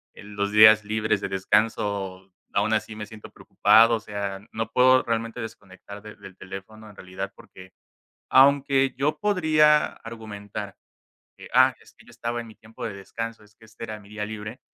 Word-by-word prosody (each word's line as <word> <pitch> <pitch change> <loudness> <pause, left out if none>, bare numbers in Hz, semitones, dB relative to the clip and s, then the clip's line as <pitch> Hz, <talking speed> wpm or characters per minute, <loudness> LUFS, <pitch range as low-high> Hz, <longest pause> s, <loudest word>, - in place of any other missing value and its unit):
en 105 0 -12
los 100 0 -1
días 110 0 +7
libres 110 0 0
de - - -4
descanso 95 -1 -1 0.3
aún 105 +2 +1
así 110 0 -2
me 105 -1 -7
siento 110 -1 -12
preocupado, 115 +1 +4
o - - -3
sea, 100 -2 -5
no 115 0 -4
puedo 130 +2 +5
realmente 115 +1 -3
desconectar 100 -2 -10
de 105 0 -10
del 100 -2 -14
teléfono 100 +3 -10
en 105 - -16
realidad, 95 -1 -7
porque 95 0 -15 0.6
aunque 135 -1 +4
yo 145 +3 -1
podría 155 -7 +4 0.2
argumentar 105 -3 -8 0.6
que: - - -11
"Ah, - - +6
es - - -20
que - - -21
yo - - -18
estaba 120 0 -4
en - - -13
mi 110 - -14
tiempo 110 +1 -11
de 110 - -3
descanso, 115 +3 -7
es 105 0 -24
que 115 - -19
este 110 +1 -10
era 110 -1 -6
mi 100 -1 -17
día 105 0 -4
libre". 110 +3 -8
110 Hz, 185 wpm, -24 LUFS, 100-115 Hz, 0.6 s, días